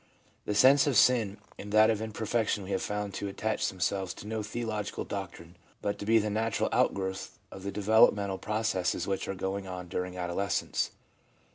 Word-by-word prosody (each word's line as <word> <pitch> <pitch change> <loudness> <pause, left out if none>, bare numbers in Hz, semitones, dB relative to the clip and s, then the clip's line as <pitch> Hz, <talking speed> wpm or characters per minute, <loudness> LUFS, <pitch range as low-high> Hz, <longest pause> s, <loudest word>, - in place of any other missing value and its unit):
The 105 - -1
sense 135 +7 +6
of 140 - +2
sin 110 -5 +4 0.2
and 100 - -7
that 110 +1 +6
of 110 -1 -2
imperfection 110 -1 -1
we 95 - -7
have 95 - 0
found 105 -1 -3
to 100 - -3
attach 110 +3 -1
themselves 95 0 -2
to - - -10
no 110 +1 -3
theological 110 -1 -3
doctrine, 90 -3 -7 0.2
but 100 0 -2
to 100 - -6
be 115 +1 +5
the 105 -1 +1
natural 110 0 0
outgrowth 95 -1 -1
of 95 - -9
the 100 +1 -4
developmental 105 -1 +3
processes 105 -5 -1
which 95 0 -2
are 95 - -3
going 95 +1 -3
on 90 -1 -6
during 90 0 -3
adolescence. 95 +3 -1
100 Hz, 175 wpm, -29 LUFS, 95-110 Hz, 0.2 s, sense